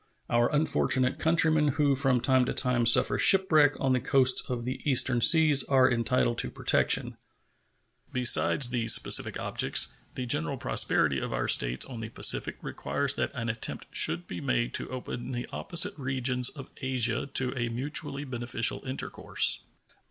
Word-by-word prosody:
Our 120 Hz, 0 st, 0 dB
unfortunate 135 Hz, -4 st, 0 dB
countrymen 160 Hz, -2 st, +1 dB
who 145 Hz, -2 st, +1 dB
from 135 Hz, -2 st, -1 dB
time 130 Hz, -1 st, +1 dB
to -, -, -5 dB
time 125 Hz, -3 st, 0 dB
suffer 115 Hz, -, +3 dB
shipwreck 155 Hz, -7 st, +3 dB
on 135 Hz, -1 st, -1 dB
the 130 Hz, -, 0 dB
coasts 130 Hz, 0 st, +2 dB
of 125 Hz, -2 st, -5 dB
the 130 Hz, +2 st, -6 dB
eastern 130 Hz, -3 st, +2 dB
seas 155 Hz, -1 st, +5 dB
are 130 Hz, -2 st, +1 dB
entitled 120 Hz, 0 st, -2 dB
to -, -, -2 dB
protection. -, -, 0 dB, 0.9 s
Besides 125 Hz, +1 st, +3 dB
these 115 Hz, -2 st, +3 dB
specific -, -, +1 dB
objects, -, -, +1 dB, 0.3 s
the 130 Hz, -, -6 dB
general 80 Hz, -10 st, 0 dB
prosperity 70 Hz, -3 st, 0 dB
of -, -, -7 dB
our -, -, -4 dB
States -, -, +3 dB
on 125 Hz, -4 st, -10 dB
the 110 Hz, 0 st, -8 dB
Pacific -, -, +2 dB
requires -, -, -1 dB
that -, -, -4 dB
an 115 Hz, -, -6 dB
attempt 110 Hz, 0 st, -6 dB
should 85 Hz, +2 st, +1 dB
be 90 Hz, 0 st, -9 dB
made -, -, -3 dB
to -, -, -2 dB
open 130 Hz, 0 st, -8 dB
the 120 Hz, 0 st, -6 dB
opposite 185 Hz, +3 st, +1 dB
regions 130 Hz, -1 st, 0 dB
of 135 Hz, -4 st, -13 dB
Asia 130 Hz, -2 st, -1 dB
to 130 Hz, 0 st, +2 dB
a 120 Hz, -2 st, -4 dB
mutually 140 Hz, +3 st, -3 dB
beneficial 120 Hz, -3 st, -1 dB
intercourse. 130 Hz, 0 st, -2 dB
130 Hz, 160 wpm, -26 LUFS, 120-140 Hz, 0.9 s, seas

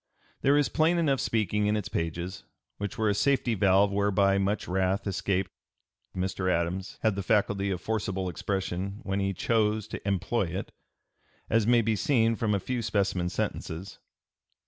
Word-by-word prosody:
There 140 Hz, +2 st, +4 dB
is 145 Hz, -, +3 dB
plain 165 Hz, +3 st, +2 dB
enough 140 Hz, -6 st, +2 dB
speaking 105 Hz, -2 st, 0 dB
in 105 Hz, +1 st, +2 dB
its 105 Hz, -, -3 dB
pages, 85 Hz, +4 st, -3 dB, 0.4 s
which 100 Hz, -1 st, -4 dB
were 110 Hz, -, +1 dB
a -, -, +3 dB
safety 130 Hz, +1 st, +2 dB
valve 100 Hz, 0 st, +4 dB
whereby 100 Hz, -1 st, +2 dB
much 100 Hz, +1 st, -1 dB
wrath 95 Hz, +2 st, 0 dB
escaped. 95 Hz, -1 st, -1 dB, 0.6 s
Mr. 95 Hz, 0 st, -1 dB
Adams 90 Hz, +4 st, -2 dB
had 110 Hz, -2 st, +3 dB
the 100 Hz, -, -2 dB
faculty 100 Hz, 0 st, +1 dB
of 90 Hz, -2 st, -2 dB
forcible 95 Hz, -4 st, -2 dB
expression 95 Hz, +3 st, -3 dB
when 95 Hz, -2 st, -1 dB
he 100 Hz, 0 st, 0 dB
chose 110 Hz, +1 st, +1 dB
to -, -, -6 dB
employ 100 Hz, +3 st, 0 dB
it, 100 Hz, -, -6 dB, 0.8 s
as 115 Hz, -1 st, +3 dB
may 120 Hz, -1 st, +5 dB
be 110 Hz, 0 st, +1 dB
seen 115 Hz, +1 st, +2 dB
from 105 Hz, -2 st, 0 dB
a -, -, +1 dB
few 125 Hz, +5 st, -3 dB
specimen 100 Hz, -5 st, 0 dB
sentences. 90 Hz, +2 st, -4 dB
100 Hz, 165 wpm, -28 LUFS, 95-110 Hz, 0.8 s, may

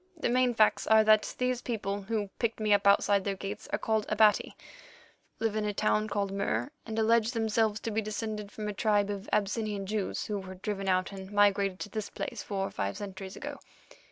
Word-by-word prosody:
The 310 Hz, -, 0 dB
main 250 Hz, 0 st, +2 dB
facts 215 Hz, -1 st, +3 dB
are 220 Hz, 0 st, +6 dB
that 215 Hz, 0 st, +4 dB
these 250 Hz, -1 st, 0 dB
people 205 Hz, -4 st, -3 dB
who 205 Hz, -1 st, -2 dB
picked 230 Hz, -1 st, -1 dB
me 215 Hz, -1 st, +3 dB
up 200 Hz, 0 st, +3 dB
outside 200 Hz, 0 st, +4 dB
their 200 Hz, 0 st, -1 dB
gates 200 Hz, +2 st, -6 dB
are -, -, +1 dB
called 220 Hz, -1 st, 0 dB
Abati, 215 Hz, 0 st, +3 dB, 0.8 s
live 220 Hz, -1 st, 0 dB
in 215 Hz, -, 0 dB
a 210 Hz, -1 st, -2 dB
town 215 Hz, +1 st, +1 dB
called 200 Hz, -2 st, -1 dB
Mur, 200 Hz, +7 st, -1 dB, 0.2 s
and 220 Hz, 0 st, -4 dB
allege 225 Hz, +1 st, +3 dB
themselves 220 Hz, -1 st, +1 dB
to 225 Hz, -, -3 dB
be 220 Hz, +1 st, 0 dB
descended 215 Hz, -1 st, -4 dB
from 210 Hz, -1 st, -5 dB
a 210 Hz, -, -2 dB
tribe 205 Hz, -1 st, +2 dB
of 200 Hz, +1 st, -6 dB
Abyssinian 210 Hz, -1 st, 0 dB
Jews 210 Hz, 0 st, -2 dB
who 210 Hz, -1 st, -2 dB
were 190 Hz, -1 st, -8 dB
driven 195 Hz, +1 st, -3 dB
out 185 Hz, +1 st, +1 dB
and 190 Hz, 0 st, -9 dB
migrated 200 Hz, -2 st, +3 dB
to 205 Hz, -, -5 dB
this 215 Hz, 0 st, -4 dB
place -, -, -5 dB
four 195 Hz, -2 st, -2 dB
or -, -, -5 dB
five 100 Hz, 0 st, -3 dB
centuries 195 Hz, -1 st, -7 dB
ago. -, -, -7 dB
210 Hz, 210 wpm, -30 LUFS, 200-220 Hz, 0.8 s, are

